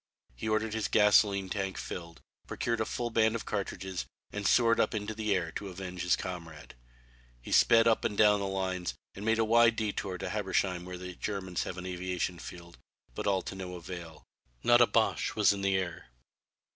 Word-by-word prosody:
He 110 - -4
ordered 110 0 0
his 110 -1 -1
gasoline 105 -2 +4
tank 95 0 -3
filled, 85 -2 -7 0.3
procured 115 -1 -1
a - - +1
full 120 +1 -3
band 110 0 +3
of 115 - -4
cartridges 95 -2 -4 0.2
and 105 -1 -2
soared 115 -2 +4
up 110 - +2
into 105 0 -3
the 105 -2 0
air 85 -3 -1
to 100 - -6
avenge 90 -1 -6
his 90 - +3
comrade. 80 -5 -7 0.7
He - - -10
sped 115 0 +6
up 115 - +3
and 105 -3 -1
down 105 -1 +5
the 100 - -2
lines, 95 -2 -2 0.2
and 100 - -8
made 110 +1 +2
a 115 - +2
wide 115 0 +5
détour 100 -4 -2
to - - -3
Habsheim 95 -3 -1
where 90 0 -6
the 90 0 -7
Germans 95 -2 -3
have 90 - -5
an 90 - -6
aviation 90 -1 -3
field, 85 -1 -10 0.3
but - - -4
all 95 -2 +2
to - - -6
no 95 -1 -6
avail. 85 -3 -8 0.4
Not - - +6
a - - +7
Boche - - +1
was - - +5
in 100 - -5
the 95 -1 +2
air. 90 -5 -4
95 Hz, 195 wpm, -30 LUFS, 90-110 Hz, 0.7 s, a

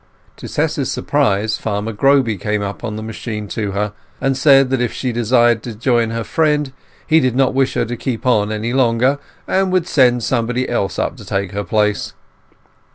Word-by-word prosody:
To - - -8
Tess's - - -1
surprise 105 +2 0
Farmer 105 +1 -3
Groby 135 0 +3
came 105 +3 -2
up 100 +3 -6
on 110 -3 -4
the 110 - -5
machine 110 -1 -5
to 105 -3 -3
her, 105 +1 -2 0.3
and 135 0 0
said 135 -1 +5
that 130 -2 +1
if 120 - 0
she 125 - -3
desired 120 0 +3
to 115 -2 -7
join 120 0 +1
her 115 0 -3
friend 150 -1 0 0.3
he 160 - +4
did 130 -4 0
not 135 0 +2
wish 135 0 +1
her - - +1
to 120 +2 -4
keep 120 0 -4
on 110 -4 +2
any 110 +3 -2
longer, 130 +2 +2 0.3
and 190 0 +1
would 185 -2 +2
send 125 -4 +3
somebody 125 +1 0
else 100 -5 -1
to - - -3
take 100 -1 -2
her 100 0 -3
place. 105 +2 0
120 Hz, 190 wpm, -18 LUFS, 105-130 Hz, 0.3 s, said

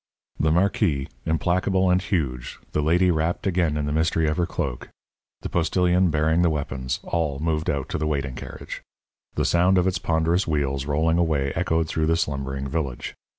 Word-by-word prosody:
The 80 - +2
marquis, 85 -5 +1 0.2
implacable 90 +4 +1
and 90 +1 +3
huge, 70 -11 -2
the 75 - 0
lady 90 +4 +3
wrapped 80 +1 -1
again 85 -5 +1
in 75 - -1
the 75 - -2
mystery 80 0 +1
of 75 - 0
her 85 -1 +1
cloak, 65 -3 -4 0.5
the - - -4
postilion 90 +2 +2
bearing 80 +2 +2
the 85 - +4
weapons 65 -4 -3
all 80 -5 -1
moved 80 +1 -1
out 70 -2 -1
to - - -2
the 80 - -1
waiting 70 -3 -1
carriage. - - -8 0.5
The - - 0
sound 90 +2 +3
of 90 - +3
its 95 -1 0
ponderous 85 +3 +1
wheels 70 -3 -1
rolling 80 +3 +2
away 75 -5 +1
echoed 80 -2 0
through 80 0 0
the 80 +1 +2
slumbering 70 -3 -2
village. 70 -4 -3
80 Hz, 180 wpm, -24 LUFS, 70-85 Hz, 0.5 s, the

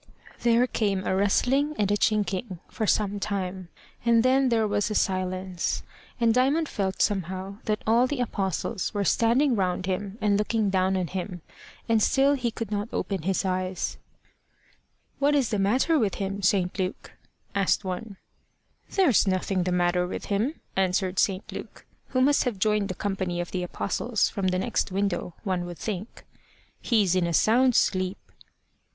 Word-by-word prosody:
There 235 +1 +4
came 200 -6 -1
a - - +1
rustling, 265 +9 +2
and 205 -1 +1
a - - +4
chinking, 205 -2 0
for 220 - -3
some 205 -1 +1
time, 185 -3 -3 0.3
and 230 -1 +4
then 260 +1 +3
there 225 -2 +2
was 205 0 0
a 215 - -3
silence, 185 -2 -1 0.4
and 230 -1 +3
Diamond 275 +6 +2
felt 190 -6 -1
somehow 190 0 -2
that 215 -1 -1
all 235 +3 +4
the 285 0 -3
Apostles 200 -2 -2
were 205 - +1
standing 240 +6 +3
round 185 -2 0
him 195 +2 -3
and 205 -2 +2
looking 210 -1 0
down 190 0 +2
on 185 - 0
him. 180 0 -5 0.4
And 225 -1 +3
still 275 +5 +4
he 255 -4 -1
could 225 -2 -6
not 205 +1 -2
open 195 -5 -2
his 190 +3 0
eyes. 185 -1 -2 1.2
"What 285 +1 +3
is 270 -5 +2
the 210 - -1
matter 255 +11 +2
with 210 -5 0
him, 195 0 -3
St. 190 -1 +1
Luke?" 185 0 -3 0.4
asked 200 0 +1
one. 190 +2 -5 0.8
"There's 290 - +4
nothing 185 -1 0
the 180 - 0
matter 180 0 +1
with - - -5
him," 235 +10 -1
answered 190 0 +1
St. 195 0 +1
Luke, - - -9 0.2
who 255 - 0
must 285 +2 +3
have 240 -5 -1
joined 210 0 +1
the 185 - -3
company 190 -3 -2
of 175 - -4
the 185 - -2
Apostles 200 +5 -1
from 195 -2 -2
the 185 0 +1
next 195 +1 -1
window, 185 -3 -2
one 185 -4 -1
would 175 -1 -7
think. 210 0 -6 0.6
"He's 205 -7 +2
in 180 -2 +2
a 170 - -2
sound 245 +7 +4
sleep." 185 0 +1
200 Hz, 170 wpm, -26 LUFS, 185-230 Hz, 1.2 s, There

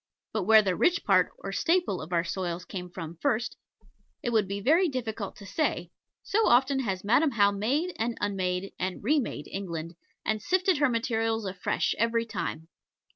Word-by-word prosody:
But 215 -4 -1
where 220 +1 +7
the 185 -3 0
rich 350 - +2
part, - - +4
or - - -6
staple, 340 - +1
of 155 +3 -9
our 170 -1 +2
soils 180 0 -3
came 180 -1 -6
from 170 -2 -7
first 240 -4 0 0.7
it 240 - -1
would 215 -4 +2
be 200 +1 -3
very 325 - +4
difficult 225 -6 -4
to 200 - -12
say, 190 - -1 0.3
so 440 +2 +2
often 265 +3 +4
has 195 -7 -2
Madam 250 +9 +4
How 205 -5 +3
made, 270 - 0
and 230 +1 -1
unmade, 190 -2 -2
and 185 +1 -3
re 295 +7 +3
made 255 - -4
England, 170 -4 -5 0.3
and 215 -1 0
sifted 370 -3 +2
her 290 -2 +4
materials 225 -2 0
afresh 185 -1 -1
every 230 +1 +1
time. 180 -6 -4
220 Hz, 180 wpm, -28 LUFS, 185-260 Hz, 0.7 s, where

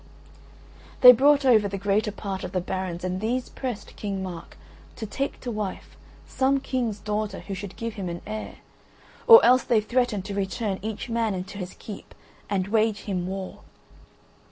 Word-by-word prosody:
They 250 - +12
brought 280 +3 +4
over 220 -5 +5
the 200 0 -4
greater 205 +2 0
part 195 -2 -5
of - - -6
the 185 - +1
barons 180 -1 -4
and 185 +1 -2
these 245 +3 -1
pressed 250 -5 -6
King 195 -2 -4
Mark 175 -3 -8 0.4
to 225 - -5
take 275 +6 -3
to 245 - -4
wife 210 -3 -5 0.3
some 270 +1 +1
king's 245 -6 -2
daughter 210 -1 -3
who 200 - -7
should 195 0 -7
give 230 -1 -4
him 190 -4 -5
an 170 0 -6
heir, 215 +1 -6 0.7
or 460 -1 +10
else 255 +1 +6
they 230 - +3
threatened 215 -3 0
to 205 - -5
return 195 0 -2
each 220 +2 -5
man 225 -3 0
into 190 +2 -6
his 180 -1 -6
keep 210 - -10 0.3
and 195 -1 -1
wage 215 -1 +1
him 180 -3 -3
war. 190 0 -6
210 Hz, 175 wpm, -25 LUFS, 190-230 Hz, 0.7 s, They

